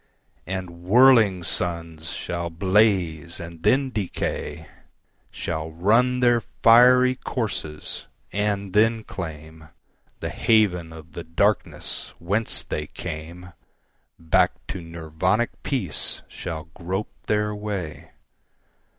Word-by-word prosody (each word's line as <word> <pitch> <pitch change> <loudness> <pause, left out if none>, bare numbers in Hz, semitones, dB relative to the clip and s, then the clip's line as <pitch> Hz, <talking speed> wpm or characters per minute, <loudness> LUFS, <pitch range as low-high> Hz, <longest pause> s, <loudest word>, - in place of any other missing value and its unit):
And 90 -2 -5
whirling 110 -2 +5
suns 85 -2 -2
shall 85 -1 -3
blaze 90 -3 +2
and 85 -1 -9
then 135 +5 +3
decay, 105 -6 -3 0.6
Shall 80 -1 -4
run 115 +10 +2
their 120 -1 +4 0.2
fiery 125 +2 +7
courses 105 - -4 0.3
and 100 -2 -1
then 110 +1 +3
claimThe 80 -3 -8 0.6
haven 90 -7 +2
of 80 +1 -12
the 85 - -7
darkness 95 +5 -1
whence 100 +6 -1
they 75 0 -4
came; 85 +5 -7 0.6
Back 80 -1 +3 0.2
to 95 - -4
Nirvanic 85 +7 -1
peace 95 - -2
shall 80 -2 -6
grope 95 +4 -4
their 105 0 +1
way. 105 -6 -5
90 Hz, 100 wpm, -24 LUFS, 85-110 Hz, 0.6 s, fiery